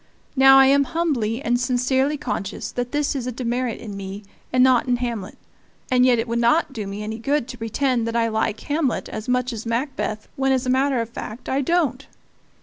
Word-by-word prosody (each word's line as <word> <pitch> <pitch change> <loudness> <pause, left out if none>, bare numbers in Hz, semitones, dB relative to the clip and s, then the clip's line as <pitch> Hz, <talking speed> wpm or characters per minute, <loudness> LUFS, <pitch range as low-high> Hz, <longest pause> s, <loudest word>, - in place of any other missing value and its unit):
Now 270 0 +7
I 270 - +8
am 280 +1 +4
humbly 270 -8 -1
and 245 +1 +1
sincerely 260 +3 +1
conscious 205 -8 -4
that 245 0 -3
this 290 -1 0
is 255 -2 -3
a - - -1
demerit 245 0 -2
in 210 -3 -7
me 195 +1 -7 0.3
and 255 0 +4
not 255 -2 +4
in 250 - +3
Hamlet; 235 -5 -4 0.5
and 250 0 +5
yet 245 -2 +4
it 225 +2 -1
would 235 +1 -1
not 265 +5 +2
do 215 -5 -5
me 200 +2 -5
any 220 +2 -5
good 275 +2 0
to 245 - -7
pretend 235 +1 0
that 230 - -3
I 230 -1 +2
like 220 -1 -1
Hamlet 290 -4 -1
as 215 - -6
much 250 0 +1
as 225 -1 -5
Macbeth 230 -3 -2
when, 270 0 +1
as 260 0 0
a 255 - +1
matter 265 -1 +2
of 230 - -5
fact, 230 0 -8
I 270 +1 0
don't. 280 -3 0
250 Hz, 215 wpm, -22 LUFS, 230-270 Hz, 0.5 s, I